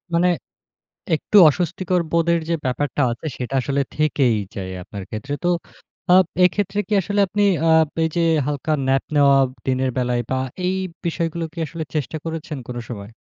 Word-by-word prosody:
মানে 175 +2 +4 0.9
একটু 210 - +1
অস্বস্তিকর 180 +3 -1
বোধের 170 0 +2
যে 170 - +2
ব্যাপারটা 140 +2 -1
আছে, 120 - -7
সেটা 125 +1 -5
আসলে 140 +3 0
থেকেই 140 -6 +2 0.2
যায় 95 -2 -5
আপনার 100 +1 -8
ক্ষেত্রে। 135 +7 -5
তো 175 - +2 0.7
আপ 185 - +6 0.2
এক্ষেত্রে 200 +2 0
কি - - -2
আসলে 205 +3 -2
আপনি 205 +2 0 0.3
আ - - +5 0.2
পে 165 - +1
যে 170 - +2 0.2
হালকা 150 +2 -1
ন্যাপ 135 0 +2
নেওয়া 140 -1 +6 0.3
দিনের 130 0 +1
বেলায় 125 -1 +1
বা 130 - +1 0.3
এই 185 - 0 0.3
বিষয়গুলো 170 0 -2
কি 170 - -7
আসলে 160 +1 -5
চেষ্টা 155 +1 -2
করেছেন 160 -2 -5
কোন 125 - -6
সময়? 105 -3 -7
150 Hz, 165 wpm, -21 LUFS, 130-170 Hz, 0.9 s, আপ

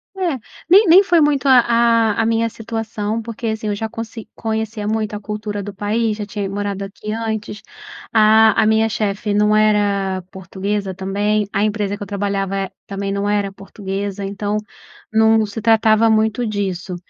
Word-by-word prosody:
É, 345 -9 -1 0.3
nem 395 +2 +7
nem 370 +5 +8
foi 350 -4 +3
muito, 290 -2 +2
a 260 -2 +7 0.5
a - - 0
a 225 - +1
minha 230 0 +1
situação 225 -1 -4
porque 230 0 -6
assim 220 -1 -3
eu 205 - -1
já 220 +2 -3
conse 225 0 -8
conhecia 220 -1 -3
muito 215 -1 -1
a 205 - -4
cultura 210 0 -5
do 200 0 -7
país, 215 +2 -1
já 210 - -4
tinha 200 -1 -4
morado 200 0 -3
aqui 210 +2 -7
antes, 220 -2 -4 0.5
a 220 0 +5
a - - +3
minha 220 +1 +3
chefe 210 0 -2
não 210 +1 +3
era 200 -3 +1
portuguesa 195 +1 -4
também, 205 +2 -1
a 200 0 +1
empresa 205 -1 -1
que 205 - -16
eu - - -9
trabalhava, 200 -1 -2
eh, 195 -1 -3 0.2
também 195 0 -4
não 200 +1 -1
era 205 -1 0
portuguesa 195 0 -5
então, 205 +1 -2 0.6
não 220 0 +4
se 210 +2 -6
tratava 225 0 +4
muito 220 +2 +1
disso. 190 -3 -3
210 Hz, 175 wpm, -19 LUFS, 200-220 Hz, 0.6 s, nem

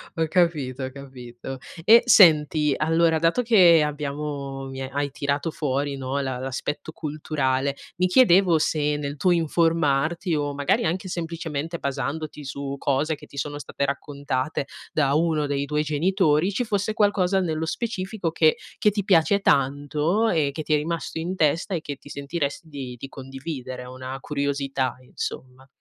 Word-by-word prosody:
Ho 160 -1 0
capito, 150 -8 +1
ho 130 - -4
capito. 130 -1 -9 0.3
E 230 +4 +7
senti, 155 - +6
allora, 165 +1 +2
dato 165 +9 +2
che 180 -9 +6
abbiamo 145 -2 -4
mi 135 0 -6
ha 130 - -4
hai 145 -1 -1
tirato 140 +3 -2
fuori, 140 -1 -2
no, 135 +1 -2
la 130 -2 -3
l'aspetto 135 +4 -4
culturale, 140 -3 -1 0.2
mi 185 +1 +3
chiedevo 180 -6 +5
se 150 -1 +1
nel 145 0 -4
tuo 180 +5 +2
informarti 165 0 +1
o 145 -1 -1
magari 140 +2 +1
anche 185 +3 -2
semplicemente 165 -1 -4
basandoti 140 +2 -4
su 140 0 -5
cose 145 +4 0
che - - -14
ti - - -17
sono 145 +2 -3
state 140 - -4
raccontate 140 0 -2 0.3
da 140 -2 +2
uno 155 -2 +1
dei 140 0 -1
tuoi 150 +1 0
genitori, 160 +2 +2
ci 245 - 0
fosse 210 -1 -1
qualcosa 195 -3 +2
nello 160 -2 -1
specifico 190 -3 -3
che 160 -1 +4 0.2
che 210 - +3
ti 205 -1 -2
piace 195 +1 +4
tanto 150 +8 +1
e 150 -4 +1
che 155 - -4
ti 155 - -1
è - - +6
rimasto 165 +2 -3
in 175 +4 -3
testa 165 +4 +1
e 165 - -1
che 145 -2 -5
ti 140 - -18
sentiresti 145 +2 -4
di 135 -4 -7
di 135 - -6
condividere, 135 -1 -7
ehm, 125 - -9
una 130 +1 -6
curiosità, 140 -3 -2
insomma? 130 +1 -7
150 Hz, 165 wpm, -24 LUFS, 140-170 Hz, 0.3 s, E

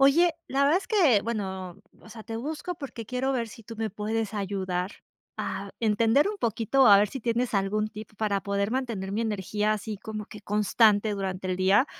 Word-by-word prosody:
Oye, 320 +5 +5 0.2
la 275 +1 +2
verdad 310 +6 +4
es 390 - -10
que 320 - +4
bueno, 190 -5 -4 0.2
o - - -15
sea, 220 0 -10
te 225 -1 -5
busco 310 +8 -4
porque 255 -8 -7
quiero 255 +2 -1
ver 235 -3 -1
si 230 - -12
tú 225 +1 -10
me 220 -2 -2
puedes 215 +1 -2
ayudar 190 -2 -2 0.5
a 195 +1 -4
entender 225 - +3
un 420 - -3
poquito 230 - +1
o - - +7
a 205 - +9
ver 205 0 +3
si 270 - -6
tienes 235 +1 0
algún 205 +2 +1
tip 215 0 -10
para 200 -2 0
poder 200 +1 -1
mantener 230 -7 -2
mi 215 - -1
energía 210 -1 0
así 215 0 -4
como 215 0 -6
que 210 - -11
constante 210 +1 +3
durante 190 -2 -3
el 185 - 0
día, 190 +8 +4
215 Hz, 205 wpm, -27 LUFS, 200-240 Hz, 0.5 s, a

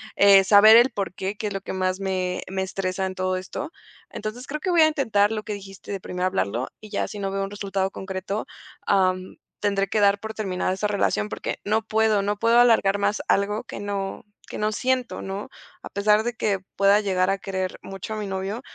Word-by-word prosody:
eh, 200 -1 +7
saber 210 +3 +8
el 240 +3 +7
porqué, 195 -2 -4
que 215 - -5
es 205 - -4
lo 195 - -4
que - - -6
más 185 0 -1
me 185 -2 -2
me 190 0 -2
estresa 190 0 -2
en 190 - -3
todo 185 0 -1
esto. 185 - -6 0.4
Entonces 240 +5 -6
creo 300 +2 -4
que 370 - -1
voy 340 - +5
a 315 - +7
intentar 220 -9 +2
lo 215 -1 -3
que 210 - -4
dijiste 195 -1 -9
de 195 - -3
primero 180 0 -3
hablarlo 115 - -1
y 215 - -11
ya 205 - -1
si 210 - -8
no 195 -1 -2
veo 195 0 -2
un 195 - -5
resultado 195 -1 -2
concreto, 190 +2 -4 0.4
am, 185 -1 +1 0.3
tendré 200 -1 0
que 215 - +1
dar 200 0 +4
por 220 0 -6
terminar 185 -4 -2
esa 210 +2 -1
relación 205 0 0
porque - - -4
no 215 +2 +2
puedo 220 -2 +2
no 205 +1 -1
puedo 230 +2 +4
alargar 220 -5 +4
más 205 0 0
algo 205 +2 +1
que - - -7
no 200 +1 -4 0.2
que - - -7
no 215 +1 0
siento, 255 +2 -1
¿no? 195 +1 -5 0.3
A - - -7
pesar 210 +2 +3
de 240 - -1
que 200 -3 0 0.2
pueda 200 +1 +5
llegar 185 -2 +1
a 195 - +1
querer 190 -1 -3
mucho 195 +2 -7
a - - -4
mi 210 - -3
novio, 195 +4 -3
200 Hz, 220 wpm, -24 LUFS, 190-215 Hz, 0.4 s, saber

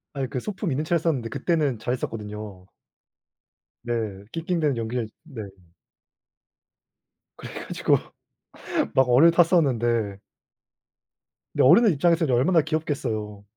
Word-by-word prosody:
아니 135 -2 -2
그 125 - -3
소품 190 - -4
있는 145 +4 -1
채로 170 +1 +1
했었는데 140 -8 -1
그때는 150 -8 0
잘했었거든요. 105 -5 -5 1.1
네. 110 -5 -3
낑낑대는 165 -5 -1
연기를 115 0 -3
네. 135 -9 -8 1.9
그래 - - -10
가지고 - - +1 1.0
막 130 -1 +4
얼을 145 +8 +6
탔었는데 120 - +2 1.4
근데 - - +2
어른들 200 - +6
입장에서는 165 +2 +2
이제 130 - +1
얼마나 165 +5 +4
귀엽겠어요. 125 -10 -3
130 Hz, 280 characters per minute, -24 LUFS, 115-165 Hz, 1.9 s, 얼을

